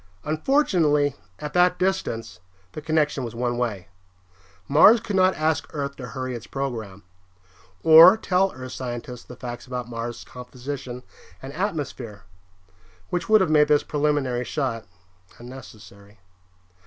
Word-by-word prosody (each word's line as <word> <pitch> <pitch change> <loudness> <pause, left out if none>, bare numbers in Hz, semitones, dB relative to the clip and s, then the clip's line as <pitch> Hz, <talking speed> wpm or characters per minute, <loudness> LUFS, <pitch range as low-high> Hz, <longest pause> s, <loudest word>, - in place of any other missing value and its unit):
Unfortunately, 155 - +1 0.2
at 150 0 -7
that 180 0 +3
distance, 115 - -2 0.3
the 155 - -7
connection 150 -3 0
was 120 -1 -6
one 120 0 -1
way. 105 -7 -3 0.8
Mars 205 +11 +7
could 205 -1 -4
not 185 0 +4
ask 155 0 0
Earth 140 -1 -3
to 125 - -7
hurry 130 0 -5
its 120 -1 -8
program. 115 -8 -5 0.8
Or 165 +6 +9
tell 190 -2 +1
Earth 130 0 -9
scientists 125 -1 -6
the 125 - -11
facts 120 -1 -8
about 125 -2 -5
Mars' 120 0 -6
composition 125 0 -8 0.4
and 135 +1 -9
atmosphere 140 - -4 0.9
which 175 +1 -2
would 215 -1 +6
have 180 -4 +1
made 150 -1 +5
this 150 -1 +3
preliminary 145 -4 0
shot 125 -5 -3 0.5
unnecessary. 110 -5 -13
135 Hz, 130 wpm, -24 LUFS, 120-155 Hz, 0.9 s, Or